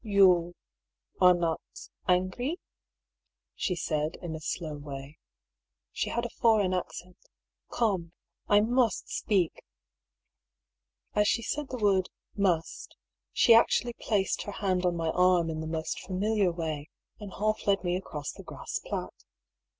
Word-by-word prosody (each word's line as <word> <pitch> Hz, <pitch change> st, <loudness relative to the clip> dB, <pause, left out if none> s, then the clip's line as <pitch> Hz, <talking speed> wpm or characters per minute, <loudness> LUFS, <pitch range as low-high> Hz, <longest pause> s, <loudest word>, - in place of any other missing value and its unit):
" -, -, -37 dB
You 185 Hz, -5 st, +4 dB, 0.7 s
are 180 Hz, -1 st, +8 dB
not 170 Hz, -2 st, -1 dB, 0.3 s
— -, -, -37 dB
angry? 245 Hz, -, -3 dB, 0.5 s
" -, -, -62 dB, 0.3 s
she 180 Hz, -, -1 dB
said 155 Hz, -1 st, -1 dB
in 170 Hz, -2 st, -5 dB
a 160 Hz, -, -5 dB
slow 155 Hz, 0 st, -4 dB
way; 145 Hz, +1 st, -8 dB, 0.7 s
she -, -, -2 dB
had 235 Hz, 0 st, -1 dB
a -, -, -3 dB
foreign 215 Hz, -5 st, +4 dB
accent. 180 Hz, 0 st, -5 dB, 0.3 s
" -, -, -42 dB
Come, 190 Hz, -8 st, 0 dB, 0.4 s
I 205 Hz, 0 st, +5 dB
must 235 Hz, -1 st, +1 dB
speak." 190 Hz, -6 st, 0 dB, 1.5 s
As 210 Hz, 0 st, +3 dB
she 230 Hz, -, +1 dB
said 295 Hz, +3 st, -3 dB
the 255 Hz, -, -4 dB
word 195 Hz, -4 st, +2 dB, 0.3 s
^^must," 180 Hz, -5 st, 0 dB, 0.4 s
she 235 Hz, -, +6 dB
actually 240 Hz, +1 st, +4 dB
placed 205 Hz, -4 st, 0 dB
her 205 Hz, -, -6 dB
hand 185 Hz, -3 st, 0 dB
on 175 Hz, -, 0 dB
my 165 Hz, -1 st, -1 dB
arm 180 Hz, -2 st, +3 dB
in 155 Hz, -, -4 dB
the 160 Hz, -, -4 dB
most 160 Hz, 0 st, -3 dB
familiar 200 Hz, 0 st, 0 dB
way, 160 Hz, -3 st, -4 dB, 0.3 s
and 205 Hz, -3 st, -8 dB
half 215 Hz, +1 st, -1 dB
led 200 Hz, -1 st, +3 dB
me 175 Hz, -1 st, 0 dB
across 150 Hz, -5 st, -5 dB
the -, -, -11 dB
grass -, -, -5 dB
plat. -, -, -4 dB
185 Hz, 150 wpm, -29 LUFS, 165-210 Hz, 1.5 s, are